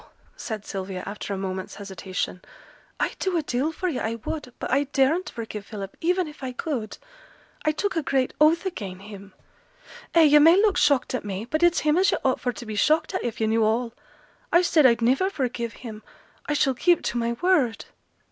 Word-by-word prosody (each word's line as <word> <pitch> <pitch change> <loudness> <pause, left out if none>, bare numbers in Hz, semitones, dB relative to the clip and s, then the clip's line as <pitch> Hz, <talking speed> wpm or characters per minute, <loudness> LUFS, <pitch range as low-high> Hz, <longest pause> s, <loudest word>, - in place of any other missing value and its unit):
said 220 - -6
Sylvia, 190 -2 -5
after 205 0 -6
a 195 - -2
moment's 190 -1 -5
hesitation; 190 -2 -5 0.6
'I'd - - -2
do 375 -2 0
a 320 - 0
deal 275 +3 -1
for 370 +3 -3
yo', 310 -8 -2
I 225 +1 -2
would, 255 +3 -6
but - - -5
I 280 +3 +3
daren't 285 +6 +1
forgive 215 -3 -7
Philip, 200 -3 -7
even 360 +1 +1
if 300 -1 -12
I 260 -1 -4
could; 250 -6 -4 0.7
I 310 - +4
took 385 +6 -2
a 325 - +1
great 265 -3 0
oath 325 +4 +4
again' 195 - -5
him. 200 -1 -11 0.8
Ay, 335 - +7
yo' 295 -1 +7
may 325 +3 +7
look 415 -2 +3
shocked 285 -7 +2
at 255 - -2
me, 200 +1 -4
but 310 +6 -2
it's 345 0 +4
him 305 +3 +3
as 385 - +4
yo' - - +1
ought 260 - +2
for 245 - -1
to 240 - -9
be 215 -1 -5
shocked 310 - +2
at 370 - -2
if 235 -2 -4
yo' 220 - +1
knew 220 +1 +2
all. 230 +2 0 0.6
I 345 +1 +5
said 310 -5 +5
I'd 235 -1 +2
niver 265 +11 +3
forgive 245 - -3
him; 215 -2 -7 0.5
I 295 - 0
shall 275 -2 +2
keep 345 +7 +2
to 240 - -1
my 235 0 0
word.' 270 -5 +1
255 Hz, 210 wpm, -25 LUFS, 215-315 Hz, 0.8 s, Ay